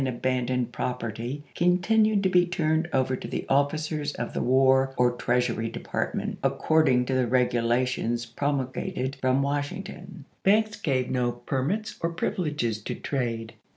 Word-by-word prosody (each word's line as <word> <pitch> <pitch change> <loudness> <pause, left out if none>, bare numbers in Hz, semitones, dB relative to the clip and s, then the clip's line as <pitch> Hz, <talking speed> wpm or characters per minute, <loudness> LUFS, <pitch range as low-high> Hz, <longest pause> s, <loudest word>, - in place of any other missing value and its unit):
abandoned 125 0 -1
property 125 +3 -4
contintied 200 +4 +3
to 190 - +3
be 180 -1 +5
turned 160 -1 0
over 130 -1 +1
to - - -7
the - - -4
officers 145 +1 0
of - - -4
the - - -1
War 130 +1 +3
or 125 0 +4
Treasmy 120 -2 0
Department, - - -3
according 140 -6 +3
to 130 - -2
the 130 -2 +2
regulations 120 -1 +1
promulgated 130 +1 -2
from 130 +1 +2
Washington. 160 +4 -4 0.2
Banks 215 +2 +2
gave 130 -4 0
no 125 -2 +1
permits 135 - -3
or 165 - +1
privileges 150 - -1
to - - -4
trade. 115 -5 -3
130 Hz, 135 wpm, -26 LUFS, 125-160 Hz, 0.2 s, be